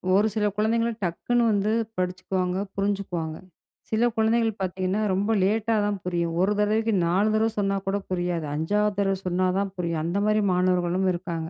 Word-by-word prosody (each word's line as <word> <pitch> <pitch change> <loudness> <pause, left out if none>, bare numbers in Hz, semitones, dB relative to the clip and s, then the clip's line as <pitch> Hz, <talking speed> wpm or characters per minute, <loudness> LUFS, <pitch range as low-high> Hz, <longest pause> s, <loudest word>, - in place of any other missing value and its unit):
ஒரு 210 +2 +4
சில 210 -1 +1
குழந்தைங்கள 230 +2 +1
டக்குனு 235 +8 0
வந்து 205 +1 +1 0.3
படிச்சுக்குவாங்க 185 0 -1 0.2
புரிஞ்சுக்குவாங்க. 195 -5 -2 0.5
சில 225 +2 +2
குழந்தைகள் 225 -1 +1
பார்த்தீங்கன்னா, 185 +2 -1
ரொம்ப 200 +4 0
லேட்டா 220 +3 +1
தான் 205 -1 -1
புரியும், 170 -2 -1
ஒரு 195 +3 +3
தரவைக்கு 215 +2 +1
4 195 +5 +2
தரவை 220 +1 +2
சொன்னா 195 -1 +1
கூட 195 - +1
புரியாது 175 -3 -1
5வது 205 +6 0
தரவ 195 -1 +2
சொன்னா 185 +1 +1
தான் 195 -1 -2
புரியும் 170 -3 -2
அந்த 170 +4 -1
மாரி 215 0 +3
மாணவர்களும் 180 0 +1
இருக்காங்க. 170 -2 -4
195 Hz, 155 wpm, -25 LUFS, 180-215 Hz, 0.5 s, ஒரு